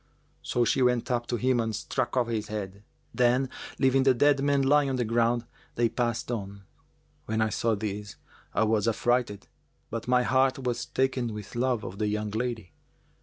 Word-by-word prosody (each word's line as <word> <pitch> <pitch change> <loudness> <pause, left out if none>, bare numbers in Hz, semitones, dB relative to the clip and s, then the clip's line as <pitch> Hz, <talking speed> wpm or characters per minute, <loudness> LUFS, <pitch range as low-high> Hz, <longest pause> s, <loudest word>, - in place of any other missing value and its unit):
So 120 -1 0
she 130 - +1
went 125 -1 +2
up 120 -1 -1
to 120 - -1
him 125 +1 +1
and 115 -1 -1
struck 130 +4 -2
off 125 - +3
his 110 -3 -2
head; 100 -2 -5 0.3
then, 125 +1 +2 0.3
leaving 135 0 +3
the 130 -1 +4
dead 145 +2 +3
man 140 -1 +2
lying 145 +1 +4
on 135 - -1
the 125 -2 0
ground, 115 +1 +1 0.3
they 120 -1 +2
passed 120 0 -2
on. 100 -3 -5 0.6
When 110 0 -1
I 110 0 +2
saw 115 +1 0
this, 105 -1 -5 0.4
I - - +1
was 110 0 +1
affrighted; 115 -2 0 0.4
but 115 0 -4
my 125 0 +3
heart 130 +1 +2
was 125 -2 -3
taken 130 -2 0
with 105 +2 -8
love 120 -2 0
of 95 - -7
the 105 - +1
young 105 0 -2
lady. 110 -5 -3
120 Hz, 185 wpm, -27 LUFS, 110-130 Hz, 0.6 s, the